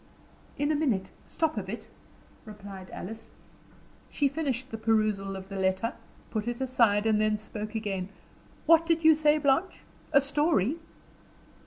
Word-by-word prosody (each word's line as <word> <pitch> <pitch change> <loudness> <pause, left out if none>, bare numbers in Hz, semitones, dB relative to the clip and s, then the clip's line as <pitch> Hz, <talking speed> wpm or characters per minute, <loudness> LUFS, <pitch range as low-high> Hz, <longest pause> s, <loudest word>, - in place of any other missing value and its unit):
"In 290 +1 +1
a - - +2
minute. 230 -11 0 0.2
Stop 315 -9 -1
a - - -2
bit," 215 +3 -7 0.6
replied 200 -3 -10
Alice. 225 +4 -8 0.8
She 285 - +1
finished 265 -3 -3
the 225 - -4
perusal 215 -3 +1
of 190 0 -8
the 195 0 -6
letter, 190 +4 0 0.4
put 215 0 -2
it 240 0 -3
aside, 235 -5 +2
and 215 -1 +3
then 215 0 +2
spoke 215 0 -7
again. 195 -4 -3 0.6
"What 330 0 +5
did 330 -1 +2
you 320 0 +8
say, 300 0 +3
Blanche? 295 +5 +1 0.3
A 280 - +7
story?" 285 - +1
225 Hz, 150 wpm, -28 LUFS, 205-290 Hz, 0.8 s, you